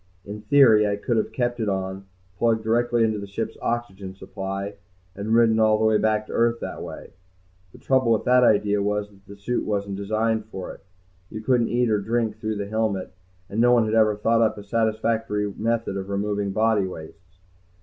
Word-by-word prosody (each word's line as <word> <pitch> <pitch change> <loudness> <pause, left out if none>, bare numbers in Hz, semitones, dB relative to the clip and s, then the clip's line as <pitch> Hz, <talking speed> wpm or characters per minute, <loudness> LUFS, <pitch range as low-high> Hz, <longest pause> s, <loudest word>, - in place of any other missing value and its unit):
In 105 +1 -7
theory 115 -6 +5
I 100 - 0
could 115 +3 -1
have 110 - -1
kept 120 -1 -2
it 110 -2 0
on, 95 0 -4 0.3
plugged 115 -1 +2
directly 120 +1 +1
into 110 -2 0
the 100 - -7
ship's 105 +3 -4
oxygen 100 -5 -4
supply, 100 +1 -5 0.4
and 105 +3 -1
ridden 115 -1 +4
all 110 -1 +4
the 110 - +1
way 110 -1 +3
back 110 0 +1
to - - -9
Earth 115 0 +2
that - - -6
way. - - -9 0.6
The - - -15
trouble 130 -3 +1
with 110 - +2
that 125 0 +4
idea 105 -3 +3
was 105 0 -2
that 95 -1 -23
the 100 - -10
suit 120 +5 -2
wasn't 100 -2 -2
designed 110 +2 -1
for 95 -4 -7
it. - - -17 0.5
You 110 - -7
couldn't 120 0 +1
eat 120 -1 +1
or 105 - +2
drink 110 0 -1
through 110 0 -3
the 100 -1 -3
helmet, 105 -3 -2 0.3
and 105 +3 -1
no 120 +1 +5
one 120 -2 +4
had 110 - -2
ever 110 -2 +4
thought 115 +2 +1
up 110 -2 +2
a 105 - -8
satisfactory 110 -1 -1
method 115 -2 -1
of 95 0 -5
removing 100 0 -1
body 110 -1 +2
wastes. 90 +1 -12
110 Hz, 200 wpm, -24 LUFS, 100-115 Hz, 0.6 s, theory